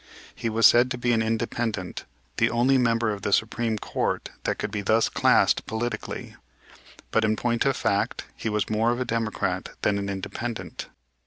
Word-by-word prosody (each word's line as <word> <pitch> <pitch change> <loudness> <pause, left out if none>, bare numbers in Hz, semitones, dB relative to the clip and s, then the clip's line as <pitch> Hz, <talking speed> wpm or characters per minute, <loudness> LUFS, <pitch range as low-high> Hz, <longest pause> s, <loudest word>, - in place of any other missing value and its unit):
He 115 - -3
was 110 0 +3
said 120 +4 +7
to 125 - -3
be 120 0 0
an 115 - +2
Independent, 110 -3 -2 0.3
the - - +3
only 130 +3 +3
member 115 -2 +2
of 100 - -7
the 100 - -2
Supreme 110 +2 +1
Court - - -2
that - - 0
could - - -3
be 105 - -2
thus 110 +3 +2
classed - - +3
politically. 120 +2 -4 0.8
But, 110 - +2
in 110 0 +2
point 120 +2 0
of 135 - +2
fact, 100 - 0
he 110 - -3
was 105 -1 0
more 110 +2 +1
of 120 +1 0
a 125 - -1
Democrat 115 -3 -2
than 100 -1 +2
an 100 0 -3
Independent. 110 +4 -5
115 Hz, 180 wpm, -25 LUFS, 105-120 Hz, 0.8 s, said